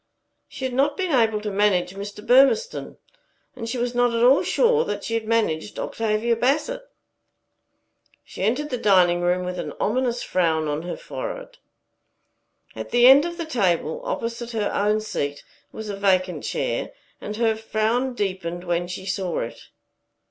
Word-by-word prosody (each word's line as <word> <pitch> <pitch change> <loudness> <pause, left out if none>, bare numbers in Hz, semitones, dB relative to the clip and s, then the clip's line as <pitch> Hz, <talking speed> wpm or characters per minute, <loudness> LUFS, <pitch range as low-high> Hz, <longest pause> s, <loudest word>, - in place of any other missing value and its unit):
She 265 - -6
had 260 - -3
not 275 +3 +1
been 370 -3 -1
able 225 -5 +2
to 210 -1 -3
manage 195 -3 +1
Mr. 205 +2 -8
Burmistone, 275 - +3 0.6
and 230 -2 -6
she 250 - -3
was 240 0 -1
not 245 -1 +2
at 230 - +1
all 260 +3 +6
sure 470 -1 +3
that - - -4
she 230 - -4
had 225 -1 -1
managed 210 -6 0
Octavia 225 +1 0
Bassett. 300 - 0 1.4
She - - -10
entered 255 +9 0
the 250 - -2
dining 180 -4 +4
room 180 +1 +1
with 180 0 -4
an - - -5
ominous 245 +2 0
frown 160 -4 +1
on 150 +1 -2
her 175 +1 -5
forehead. - - -7 1.2
At - - -6
the 240 0 +4
end 270 +4 +8
of 345 0 -5
the 335 - -3
table, 235 - 0
opposite 235 - -4
her 215 -2 -1
own 210 +1 +1
seat, 145 -9 -4 0.3
was 220 - -7
a 205 - -4
vacant 190 -2 +1
chair, - - -2 0.3
and 210 - -5
her 225 -1 +2
frown 220 +4 -1
deepened 185 -4 -3
when 175 0 -1
she 185 +1 -7
saw 185 -2 -2
it. 115 - -8
220 Hz, 165 wpm, -23 LUFS, 185-255 Hz, 1.4 s, end